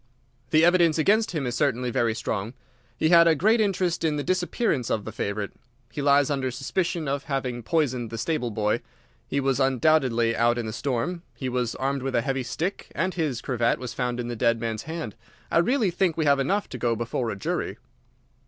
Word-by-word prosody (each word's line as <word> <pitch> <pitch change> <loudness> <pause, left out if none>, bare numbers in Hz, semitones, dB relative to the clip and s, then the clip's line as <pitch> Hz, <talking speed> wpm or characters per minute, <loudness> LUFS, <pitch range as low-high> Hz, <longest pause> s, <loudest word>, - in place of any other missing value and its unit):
The 155 +4 +5
evidence 175 -2 +4
against 215 +7 +3
him 155 -6 -2
is 120 - -2
certainly 125 -2 0
very 115 -1 +1
strong. 115 0 -3 0.4
He 155 - +2
had 170 -1 +7
a 165 - +5
great 220 +9 +3
interest 185 -5 0
in 155 -2 +1
the 145 - -2
disappearance 180 - 0
of 105 - -1
the - - -5
favourite. 100 0 -3 0.4
He 145 - -4
lies 140 0 +4
under 135 -2 0
suspicion 170 +5 -2
of 140 0 -2
having 130 -4 -2
poisoned 125 -4 0
the 115 - -6
stable 125 0 -1
boy, 105 -1 0 0.5
he 140 - -1
was 135 -1 +1
undoubtedly 130 -3 +2
out 120 +1 +2
in 120 - -2
the 110 - -4
storm, 140 +8 -2
he 130 - -3
was 125 -2 -1
armed 135 +1 -1
with 135 0 -2
a 120 - +3
heavy 135 +1 -1
stick, 165 +9 -4
and 185 +2 0
his 150 -8 -2
cravat 120 -2 +1
was 125 -2 -6
found 125 -1 -2
in 120 - -3
the 120 - -4
dead 115 0 +2
man's 110 -1 -3
hand. 160 -10 -5 0.4
I - - +4
really 220 +2 +2
think 175 -1 0
we 160 - +1
have 140 -1 +4
enough 195 +10 0
to 125 - -7
go 115 0 +1
before 115 +1 -2
a - - -3
jury." 100 - -3
135 Hz, 210 wpm, -25 LUFS, 120-165 Hz, 0.5 s, had